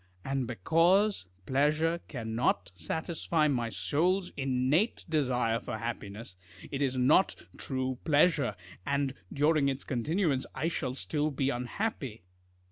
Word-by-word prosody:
And 135 Hz, -2 st, -1 dB
because 165 Hz, -, +2 dB, 0.2 s
pleasure 155 Hz, +6 st, +2 dB
cannot 110 Hz, -, -1 dB
satisfy 160 Hz, -, -1 dB
my 120 Hz, -5 st, 0 dB
soul's 165 Hz, -, 0 dB
innate 135 Hz, -, +1 dB
desire 125 Hz, -7 st, +1 dB
for 110 Hz, -, -5 dB
happiness, 110 Hz, -3 st, -6 dB, 0.4 s
it 140 Hz, -, -3 dB
is 130 Hz, -2 st, +1 dB
not 145 Hz, +9 st, +4 dB, 0.2 s
true 130 Hz, -1 st, -3 dB
pleasure, 150 Hz, -, +3 dB, 0.3 s
and 140 Hz, +1 st, 0 dB, 0.2 s
during 150 Hz, -1 st, +3 dB
its 135 Hz, 0 st, -3 dB
continuance 145 Hz, -, 0 dB
I 165 Hz, -, 0 dB
shall 130 Hz, -6 st, -2 dB
still 150 Hz, +2 st, 0 dB
be 140 Hz, -1 st, 0 dB
unhappy. 125 Hz, -, -3 dB
135 Hz, 120 wpm, -30 LUFS, 120-160 Hz, 0.4 s, not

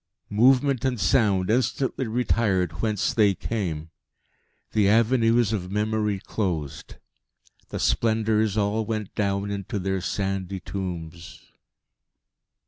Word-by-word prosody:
Movement 130 Hz, +4 st, +3 dB
and 130 Hz, -3 st, 0 dB
sound 100 Hz, -2 st, +2 dB
instantly 130 Hz, +1 st, 0 dB
retired 105 Hz, -7 st, 0 dB
whence 105 Hz, -3 st, 0 dB
they 105 Hz, -4 st, +3 dB
came. 85 Hz, -9 st, -4 dB, 0.8 s
The 105 Hz, -2 st, +3 dB
avenues 115 Hz, 0 st, +3 dB
of 90 Hz, -3 st, -3 dB
Memory 105 Hz, 0 st, 0 dB
closed; 85 Hz, -9 st, -4 dB, 0.7 s
the -, -, -4 dB
Splendours 110 Hz, -2 st, +1 dB
all 105 Hz, +2 st, +1 dB
went 110 Hz, -2 st, -4 dB
down 100 Hz, 0 st, -1 dB
into 100 Hz, 0 st, -4 dB
their 95 Hz, 0 st, -1 dB
sandy 95 Hz, 0 st, -2 dB
tombs.... 85 Hz, -3 st, -7 dB
105 Hz, 105 wpm, -25 LUFS, 95-115 Hz, 0.8 s, Movement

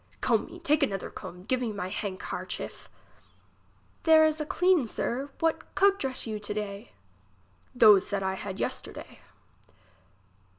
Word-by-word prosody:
Comb -, -, +1 dB
me, -, -, -11 dB
take 300 Hz, +1 st, +1 dB
another 195 Hz, -9 st, -1 dB
comb. 180 Hz, +1 st, -9 dB
Give 255 Hz, +5 st, 0 dB
me 235 Hz, -3 st, -1 dB
my 185 Hz, -3 st, -5 dB
handkarchief. 200 Hz, -2 st, -5 dB, 1.1 s
There 320 Hz, -1 st, +6 dB
is 310 Hz, 0 st, +1 dB
a 300 Hz, -, -4 dB
clean, 355 Hz, -8 st, +3 dB
sir. 265 Hz, +5 st, -2 dB
What 325 Hz, -1 st, -1 dB
coat 395 Hz, 0 st, +4 dB
dress 265 Hz, -2 st, -2 dB
you 215 Hz, -2 st, -4 dB
to 205 Hz, 0 st, -4 dB
day? 205 Hz, +1 st, -5 dB, 0.8 s
Those 210 Hz, -5 st, +6 dB
that 200 Hz, -1 st, -1 dB
I 190 Hz, 0 st, 0 dB
had 190 Hz, 0 st, -6 dB
yesterday. -, -, -5 dB
225 Hz, 140 wpm, -28 LUFS, 200-305 Hz, 1.1 s, There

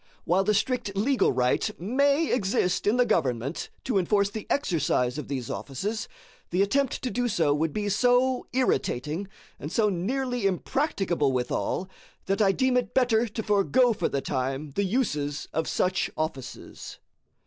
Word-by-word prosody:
While 185 Hz, +3 st, +2 dB
the 210 Hz, +1 st, +2 dB
strict 240 Hz, -3 st, -1 dB
legal 255 Hz, +6 st, +2 dB
right 125 Hz, 0 st, +1 dB
may 280 Hz, -, +2 dB
exist 195 Hz, -5 st, 0 dB
in 220 Hz, +4 st, +3 dB
the 245 Hz, -, +4 dB
government 135 Hz, -, -1 dB
to 235 Hz, -7 st, +1 dB
enforce 200 Hz, +2 st, +1 dB
the 215 Hz, -1 st, -6 dB
exercise 150 Hz, -, 0 dB
of -, -, -6 dB
these 130 Hz, -4 st, -4 dB
offices, 200 Hz, -, -4 dB, 0.4 s
the 180 Hz, +3 st, +2 dB
attempt 270 Hz, +6 st, 0 dB
to 250 Hz, -, -1 dB
do 245 Hz, 0 st, 0 dB
so 165 Hz, -10 st, +2 dB
would 155 Hz, +2 st, 0 dB
be 210 Hz, +3 st, -2 dB
so 245 Hz, +4 st, +2 dB
irritating, 165 Hz, -, 0 dB, 0.3 s
and 150 Hz, -, -6 dB
so 215 Hz, 0 st, +2 dB
nearly 245 Hz, +4 st, -1 dB
impracticable 190 Hz, -, 0 dB
withal, 130 Hz, +8 st, -1 dB, 0.4 s
that 195 Hz, +2 st, 0 dB
I 195 Hz, -2 st, +5 dB
deem 260 Hz, +3 st, +2 dB
it 250 Hz, -, -2 dB
better 240 Hz, -2 st, +3 dB
to 220 Hz, +1 st, -5 dB
forego 225 Hz, +4 st, +3 dB
for -, -, -1 dB
the 140 Hz, -, -1 dB
time 135 Hz, +2 st, -3 dB
the 200 Hz, +8 st, 0 dB
uses 150 Hz, -, -1 dB
of 160 Hz, +1 st, -1 dB
such 185 Hz, 0 st, 0 dB
offices. 155 Hz, -5 st, -6 dB
200 Hz, 160 wpm, -26 LUFS, 150-245 Hz, 0.4 s, I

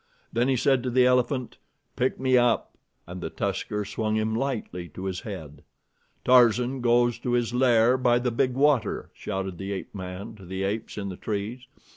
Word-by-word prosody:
Then 120 Hz, +2 st, +2 dB
he 135 Hz, -, +2 dB
said 130 Hz, +1 st, +2 dB
to 125 Hz, -, -2 dB
the 125 Hz, +1 st, +4 dB
elephant: 125 Hz, 0 st, +1 dB, 0.4 s
"Pick 130 Hz, +1 st, 0 dB
me 130 Hz, 0 st, +2 dB
up!" 120 Hz, -2 st, +2 dB, 0.3 s
and 90 Hz, +1 st, -8 dB
the -, -, -3 dB
tusker 105 Hz, -1 st, -2 dB
swung 110 Hz, +1 st, -2 dB
him 110 Hz, 0 st, 0 dB
lightly 110 Hz, -9 st, -3 dB
to 95 Hz, -, -6 dB
his 95 Hz, -1 st, -2 dB
head. 75 Hz, -8 st, -8 dB, 0.6 s
"Tarzan 125 Hz, +1 st, +4 dB
goes 120 Hz, 0 st, +3 dB
to 120 Hz, -, -2 dB
his 120 Hz, -1 st, +1 dB
lair 125 Hz, 0 st, +4 dB
by 120 Hz, -1 st, +4 dB
the 125 Hz, 0 st, 0 dB
big 125 Hz, +2 st, +1 dB
water," 135 Hz, -6 st, +1 dB
shouted 95 Hz, -2 st, -4 dB
the 95 Hz, +1 st, -4 dB
ape 95 Hz, -, -5 dB
man 95 Hz, +2 st, -7 dB
to 95 Hz, -, -13 dB
the 95 Hz, +1 st, -3 dB
apes 105 Hz, +3 st, -3 dB
in 100 Hz, -1 st, -3 dB
the 90 Hz, -, -7 dB
trees. 110 Hz, +4 st, -4 dB
115 Hz, 185 wpm, -26 LUFS, 100-125 Hz, 0.6 s, the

